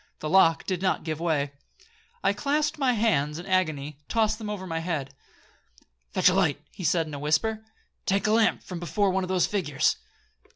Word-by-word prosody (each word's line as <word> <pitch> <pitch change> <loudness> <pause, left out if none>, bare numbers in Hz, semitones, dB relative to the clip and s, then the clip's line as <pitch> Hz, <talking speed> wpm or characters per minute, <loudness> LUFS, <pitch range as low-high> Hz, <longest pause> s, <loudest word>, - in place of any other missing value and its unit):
The 155 - -4
lock 165 -3 +4
did 185 -2 -2
not 190 -1 0
give 155 -1 -3
way—I 170 - -3
clasped 295 +7 0
my 260 -3 +3
hands 160 -10 +1
in 175 - -7
agony—I 150 -6 -1
tossed 220 -1 +1
them 215 -2 -5
over 205 -3 -4
my 165 -2 -3
head. 155 -5 -3 1.0
'Fetch - - +5
a - - +1
light,' 175 -7 +2
he 185 - -9
said 165 0 +2
in 155 - -9
a 145 - -5
whisper; 185 +10 0 0.4
'take 195 +2 +1
a 215 - +2
lamp 225 0 +3
from 180 -2 -6
before 180 +4 +1
one 190 0 0
of - - -3
those 185 -2 +3
figures.' 155 -8 0
185 Hz, 190 wpm, -26 LUFS, 155-210 Hz, 1.0 s, Fetch